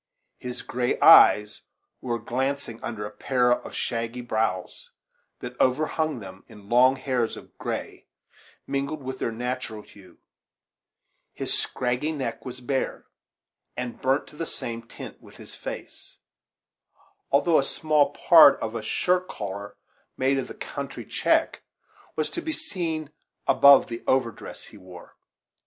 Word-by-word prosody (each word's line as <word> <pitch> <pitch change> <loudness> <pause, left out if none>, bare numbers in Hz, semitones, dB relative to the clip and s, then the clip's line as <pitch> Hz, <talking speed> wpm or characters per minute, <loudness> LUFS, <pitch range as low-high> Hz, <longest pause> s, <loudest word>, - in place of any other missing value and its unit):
His 125 -2 -6
gray 125 0 -1
eyes 105 0 +7 0.4
were 120 -2 -2
glancing 125 +1 -3
under 105 -3 -5
a 105 - -7
pair 125 +3 +1
of 120 - -1
shaggy 115 +1 -3
brows, 110 -6 -2 0.5
that 125 0 -7
over 130 +4 +3
hung 155 -2 -1
them 95 -3 -10
in 105 -1 -15
long 130 +2 +5
hairs 130 -4 -1
of - - -14
gray - - -5 0.6
mingled 140 +2 -3
with 130 0 -5
their - - -1
natural 120 -2 -4
hue; 95 -4 -18 1.2
his - - -2
scraggy 125 +5 -1
neck 130 -7 -4
was 125 0 -8
bare, 130 +2 -2 0.7
and 125 -1 -5
burnt 135 +2 +1
to - - -16
the 165 +1 -4
same 115 0 -6
tint - - -10
with - - -16
his - - -12
face; - - -8 1.1
though 155 +4 +4
a - - +2
small 150 0 +2
part 160 -1 +7
of 110 0 -4
a 115 - -3
shirt 180 +11 0
collar, 100 0 -6 0.4
made 135 +1 +2
of 130 - -4
the - - -9
country - - -6
check, - - +1 0.5
was 155 - -1
to 340 - -4
be 320 - -3
seen 170 - -4 0.3
above 135 +1 +7
the 115 -1 -6
overdress 125 -4 -1
he - - -14
wore. 90 -1 -13
125 Hz, 145 wpm, -25 LUFS, 115-140 Hz, 1.2 s, eyes